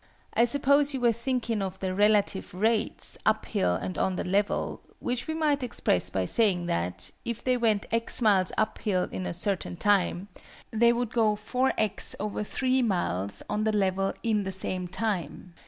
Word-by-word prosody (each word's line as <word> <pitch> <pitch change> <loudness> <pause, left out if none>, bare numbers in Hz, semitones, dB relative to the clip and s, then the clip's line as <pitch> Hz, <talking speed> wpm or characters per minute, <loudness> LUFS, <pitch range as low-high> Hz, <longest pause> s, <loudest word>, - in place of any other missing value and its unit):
I 235 - +4
suppose 280 +2 +2
you - - -2
were 240 -1 +4
thinking 235 -2 -2
of 190 -1 -4
the 190 -1 -2
relative 205 -2 +2
rates, 220 +3 -1
up - - +1
hill 90 -1 0
and 185 - -4
on 190 - +1
the - - -2
level; 200 +3 -1 0.2
which 245 0 -3
we 315 - -2
might 300 -3 +1
express 90 - +1
by 95 0 -1
saying 190 - +2
that, 90 - -1
if 235 -1 -4
they 255 -1 +2
went 225 -4 +1
x 230 0 +2
miles 200 -6 +3
up 215 0 0
hill 185 -4 0
in 185 - -4
a - - -3
certain 175 -1 -2
time, 195 -1 +1 0.4
they 235 +1 +4
would 240 -1 -1
go 220 -3 +2
4_x_/3 220 +1 0
miles 100 - -1
on 210 - -1
the 215 -1 +1
level 195 0 +1
in 215 -3 +1
the 190 - -3
same 185 -1 -2
time. 185 -2 -3
210 Hz, 170 wpm, -27 LUFS, 185-235 Hz, 0.4 s, I